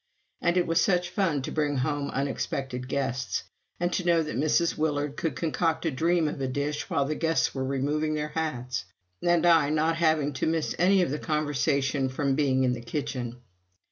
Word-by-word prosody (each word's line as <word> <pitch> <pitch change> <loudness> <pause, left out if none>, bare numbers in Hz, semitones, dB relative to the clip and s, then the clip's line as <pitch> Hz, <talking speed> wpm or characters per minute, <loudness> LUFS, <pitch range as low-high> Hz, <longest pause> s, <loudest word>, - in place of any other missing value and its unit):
And 175 +1 +2
it 180 - +3
was 165 0 +2
such 180 -2 +1
fun 165 -9 0
to - - -4
bring 150 -2 0
home 145 +2 -1
unexpected 135 -2 -3
guests, 130 -2 -2 0.4
and 175 +1 0
to 180 - 0
know 170 -2 +3
that 155 - -5
Mrs. 155 +3 +2
Willard 145 -2 -1
could 165 - -2
concoct 165 0 0
a 165 - +1
dream 165 +4 +2
of 150 - -4
a 135 - 0
dish 145 +3 -2
while 140 - +1
the 150 - -1
guests 165 +1 +1
were 130 - -2
removing 145 +3 0
their 150 0 -2
hats; 130 - -3 0.4
and 175 -1 +3
I 165 -4 +5
not 155 +2 +1
having 155 -3 +2
to 130 - -1
miss 160 -1 0
any 185 +1 +5
of 155 - -1
the 150 - -2
conversation 145 -3 0
from 135 +1 0
being 135 -2 +2
in 125 -1 +2
the 120 - -5
kitchen. 125 -1 -4
150 Hz, 195 wpm, -27 LUFS, 135-165 Hz, 0.4 s, I